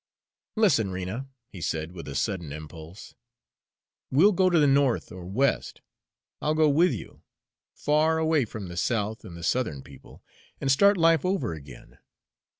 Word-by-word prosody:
"Listen, 190 - +3
Rena," 95 +8 -5 0.2
he 90 - -11
said, 80 0 -3
with 85 -3 -9
a 70 - -6
sudden 90 -7 -2
impulse, 80 +4 -10 1.0
"we'll 165 +11 +5
go 185 -1 +3
to 175 - +2
the 150 - +5
North 140 -3 +2
or 90 -1 -9
West 125 +7 -1 0.6
I'll 150 +1 0
go 155 0 +4
with 165 +6 +4
you 110 -9 -8 0.5
far 155 +2 +2
away 160 -4 +2
from 105 -3 -7
the 85 0 -8
South 110 +2 -1
and 85 - -10
the 85 - -9
Southern 85 - -1
people, 65 -1 -16 0.4
and 135 - +1
start 200 +9 +5
life 165 -2 +4
over 180 - -1
again. 70 -5 -13
115 Hz, 155 wpm, -26 LUFS, -, 1.0 s, we'll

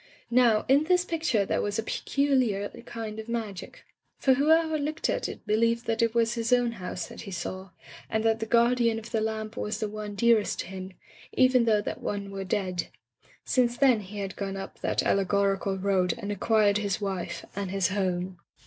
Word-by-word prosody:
Now, 235 -3 +4
in 280 +3 +4
this 360 +1 +3
picture 310 - 0
there - - 0
was 205 0 -2
a 225 - -1
peculiar 255 -6 +1 0.2
kind 220 -2 -6
of 220 +1 -8
magic, 220 -5 -5 0.3
for 265 - +4
whoever 315 +3 +3
looked 305 +3 -1
at - - -2
it - - -9
believed 230 +2 +1
that 225 0 0
it 230 0 +1
was 230 0 +2
his 230 0 -2
own 245 -1 +3
house 185 -5 -5
that - - -10
he - - -8
saw, 185 +1 -5 0.4
and 220 0 0
that 225 0 +2
the 225 - -3
guardian 235 0 +3
of 225 +1 -8
the 225 - 0
lamp 220 0 -3
was 210 +1 -3
the 215 - -1
one 210 0 -6
dearest 225 0 +3
to - - -7
him, 190 0 -7 0.4
even 255 -2 +4
though 215 -2 +3
that - - -5
one 200 -1 -4
were 195 0 -4
dead. 185 -2 -2 0.6
Since 245 -2 +2
then 260 -5 +5
he 205 +1 -9
had 195 -1 -4
gone 195 -1 -4
up 195 - -8
that - - 0
allegorical 195 0 +1
road 185 -2 +1
and 205 -3 -4
acquired 210 0 +3
his 200 -1 -1
wife 195 -3 -4
and 200 -1 -3
his 190 -2 +1
home. 185 -2 -2
215 Hz, 195 wpm, -27 LUFS, 195-235 Hz, 0.6 s, then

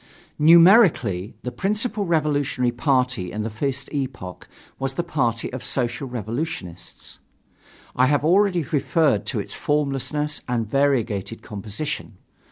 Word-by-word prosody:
Numerically, 165 - +5
the 125 - -3
principal 210 - -1
revolutionary 145 -6 +1
party 125 - 0
in 105 +1 -3
the 110 - -4
first 135 +4 -3
epoch 130 -11 -5 0.3
was 135 0 -2
the 170 - -2
party 125 -9 -1
of 130 - -5
Social 130 +2 -2
Revolutionists. 115 - -6 0.8
I 130 +1 +4
have 145 +1 +1
already 180 0 +3
referred 140 - +1
to - - -1
its - - -6
formlessness 150 +1 -1
and 120 -3 -1
variegated 115 -5 0
composition. 105 +2 -5
135 Hz, 120 wpm, -23 LUFS, 115-150 Hz, 0.8 s, Numerically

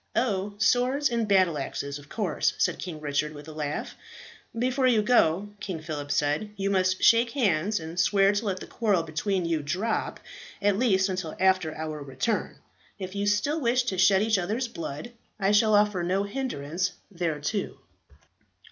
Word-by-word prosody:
"Oh, 205 -4 0
swords 255 +5 +2
and 230 -2 0
battle 185 -6 +3
axes, 140 +1 -4
of 145 +1 -16
course," 205 -6 0
said - - +1
King 170 -4 -6
Richard 150 0 -1
with 145 +1 -11
a - - -8
laugh. 150 -1 -4 0.6
"Before 255 +2 +1
you 225 -4 +3
go," 205 -4 +3
King 185 -5 -5
Phillip 150 -2 -6
said, 150 +8 0
"you 195 0 -1
must 185 -1 +1
shake 230 0 +5
hands, 205 - +1
and 165 +2 -6
swear 195 +2 +4
to 205 +2 -2
let 190 -2 -1
the - - -8
quarrel 205 -7 0
between 175 +4 -1
you 165 -2 0
drop, 185 +10 -2 0.4
at 205 -1 +2
least 195 -6 +3
until 185 -4 -4
after 185 -4 +2
our 155 -1 -5
return. 140 - -2 0.4
If 185 -1 -6
you 200 0 -2
still 285 +10 +1
wish 250 +1 +2
to 190 -7 -2
shed 195 +1 +5
each 220 -2 +2
other's 220 +8 -1
blood, 165 0 -6 0.3
I 195 0 +2
shall 210 0 +4
offer 205 -3 +3
no 185 +3 0
hindrance 190 - -3 0.2
thereto." 165 +3 -2
190 Hz, 170 wpm, -27 LUFS, 160-215 Hz, 0.6 s, shake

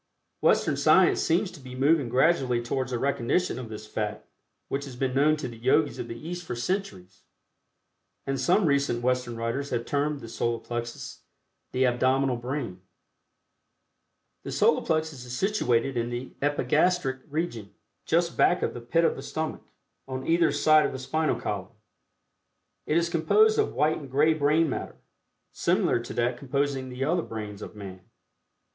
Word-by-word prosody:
Western - - +3
science - - +4
seems 180 +4 +1
to 175 - -12
be 130 -2 -10
moving 140 0 +2
gradually 130 -1 +2
towards 130 +2 -2
a 125 - 0
recognition 140 +6 0
of 120 -3 -7
this 110 0 -8
fact 105 0 -4 0.4
which 140 +1 -3
has 135 -3 -9
been 130 0 -1
known 150 +3 +3
to 150 - -4
the 115 -2 -10
Yogis 140 +5 +2
of - - -4
the 115 - -7
East 175 +1 -5
for 125 - -5
centuries, 105 - -4 1.0
and 135 -1 -2
some 180 +8 +3
recent 140 -5 +1
Western 125 -1 0
writers 115 +5 -2
have 120 -1 -2
termed 145 0 -1
the 115 - -9
Solar 115 +1 -1
Plexus 120 0 -6 0.5
the 130 +1 +2
"Abdominal 130 +1 +2
Brain." 120 -7 -4 1.6
The - - -7
Solar - - +3
Plexus 155 -5 -1
is 125 0 -6
situated 135 - +1
in 120 0 -1
the 120 +2 -5
Epigastric 145 +1 +1
region, 140 - -3 0.4
just 170 +1 +1
back 180 - +3
of - - -1
the 120 - -7
"pit 165 +8 +2
of - - +2
the - - -7
stomach" 160 0 -4 0.5
on 130 0 -5
either 165 0 +3
side 155 0 +5
of - - -6
the - - -4
spinal 155 +4 -1
column. 105 +2 -4 1.1
It 155 - +2
is 170 0 +2
composed 425 - +3
of 430 - 0
white 155 +1 +2
and 140 -3 -10
gray 150 +5 +3
brain 155 +2 +2
matter, 135 - -4 0.6
similar - - +1
to 120 - -7
that 120 +1 0
composing 140 -1 -1
the 125 +1 -4
other 170 +5 +1
brains 105 -6 -7
of - - -8
man. 95 -3 -9
135 Hz, 165 wpm, -27 LUFS, 120-155 Hz, 1.6 s, side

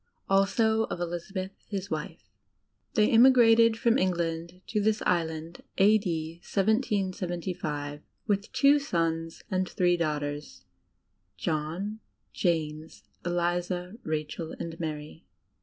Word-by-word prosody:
Also 220 +3 +3
of - - -5
Elizabeth, 175 +2 -4 0.2
his 200 -2 -4
wife. 155 -7 -5 0.7
They 210 0 +4
emigrated 230 -2 +6
from 235 +2 +3
Etigtand 170 -1 -1
to 210 - -1
this 215 +1 +1
Island, 165 -1 -1 0.2
a.d. 190 -6 +3
1775, 180 - -1 0.2
with 205 -1 -1
two 280 +3 +5
sons 165 - -2
and 185 -1 0
three 175 -1 +2
daughters, 150 -2 -2
viz., 90 - -19 0.7
John, 165 - -2 0.3
James, 160 -3 -2 0.2
Eliza, 175 +1 -1
Rachel, 155 +1 -4
and 165 0 -6
Mary. 155 -1 -5
175 Hz, 105 wpm, -28 LUFS, 160-205 Hz, 0.7 s, emigrated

